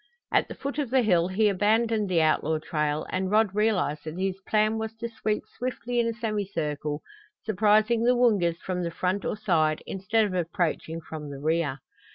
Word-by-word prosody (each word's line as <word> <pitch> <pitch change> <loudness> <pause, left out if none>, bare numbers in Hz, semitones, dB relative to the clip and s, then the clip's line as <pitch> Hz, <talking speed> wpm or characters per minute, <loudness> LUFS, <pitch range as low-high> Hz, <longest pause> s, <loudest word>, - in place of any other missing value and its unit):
At - - +3
the - - -8
foot 280 +2 -4
of 280 -5 -1
the 260 0 +3
hill 175 -5 +3
he 205 +4 +2
abandoned 215 +1 +2
the 170 -3 +3
outlaw 155 0 +2
trail 150 -1 -1
and 185 0 -1
Rod 210 -1 +3
realized 200 -8 +1
that 155 +2 -6
his 190 0 -2
plan 215 +1 +2
was 220 0 -4
to 235 +1 -4
sweep 220 -2 -2
swiftly 245 -1 -3
in 235 - +2
a 230 - -1
semicircle, 165 -10 -3 0.4
surprising 215 +2 +3
the 250 +1 +4
Woongas 205 -9 +3
from 180 0 -3
the 170 - -1
front 185 +3 -2
or - - -2
side 160 -7 +1
instead 215 +4 +1
of 200 - -3
approaching 170 -2 -1
from 155 -2 -7
the 140 - -7
rear. 150 -2 -1
195 Hz, 190 wpm, -27 LUFS, 165-220 Hz, 0.4 s, the